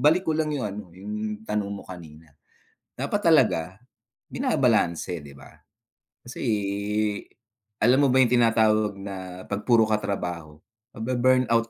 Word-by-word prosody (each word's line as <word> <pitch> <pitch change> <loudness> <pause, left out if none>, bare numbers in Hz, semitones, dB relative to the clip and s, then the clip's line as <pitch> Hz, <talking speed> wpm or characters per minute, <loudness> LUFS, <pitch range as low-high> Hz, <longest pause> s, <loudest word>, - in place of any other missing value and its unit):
balik 165 +5 +4
ko - - +3
lang 155 -1 0
yung 135 - -2
ano, 105 +1 -6
yung 105 +2 -5
tanong 105 -2 -2
mo 100 - -7
kanina. 80 -3 -12 0.7
Dapat - - -2
talaga - - +5 0.7
binabalanse, 85 -1 +1
'di 70 -1 -12
ba? 70 - -14 0.8
Kasi 120 - -8 1.4
alam 125 +2 +5
mo 140 - +4
ba 130 +1 +5
yung 125 -1 +3
tinatawag 110 -3 +3
na 95 -2 -7
'pag 100 +1 -3
puro 115 -3 +5
ka 110 -1 +2
trabaho 85 -6 -4 0.4
mabe-burnout 120 0 +2
105 Hz, 135 wpm, -25 LUFS, 95-120 Hz, 1.4 s, talaga